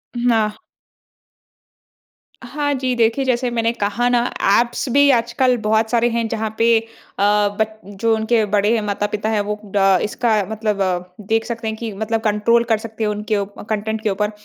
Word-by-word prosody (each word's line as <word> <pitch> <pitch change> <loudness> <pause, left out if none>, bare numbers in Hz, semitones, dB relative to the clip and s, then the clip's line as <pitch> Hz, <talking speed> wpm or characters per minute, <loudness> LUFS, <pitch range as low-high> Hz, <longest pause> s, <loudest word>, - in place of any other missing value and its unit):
हुँ, 240 0 +1
हाँ। 215 -1 +1 1.9
हाँ 290 +3 -2
जी, 260 -1 -1
देखिए 230 +3 +2
जैसे 250 -1 0
मैंने 230 -1 +1
कहा 235 +2 -1
ना, 240 -1 +3 0.4
ऐप्स 240 +3 -1
भी 285 +2 +5
आजकल 240 +1 +2
बहुत 220 0 +1
सारे 240 0 +3
हैं 230 -1 -1
जहाँ 220 -1 -2
पे 230 0 +4
अ, 225 - -12 0.7
बट 220 0 -1 0.2
जो 230 -1 +3
उनके 220 +1 +1
बड़े 210 +2 +3
हैं 225 - +1
माता-पिता 205 +1 -2
हैं, 215 -2 +1
वो 210 +1 -4 0.2
ड 195 -2 +4
इसका 225 +2 -1 0.2
मतलब 215 -2 -2 0.5
देख 225 +1 +1
सकते 230 -1 -5
हैं 220 - -2
कि 225 0 -5
मतलब 220 +2 -2
कंट्रोल 225 +2 +2
कर 220 - +4
सकते 220 0 -6
हैं 210 - +1
उनके 210 0 -2
उ 200 - -1 0.2
कंटेंट 220 +1 -2
के 215 - +1
ऊपर। 210 +2 -1
225 Hz, 180 wpm, -19 LUFS, 210-235 Hz, 1.9 s, भी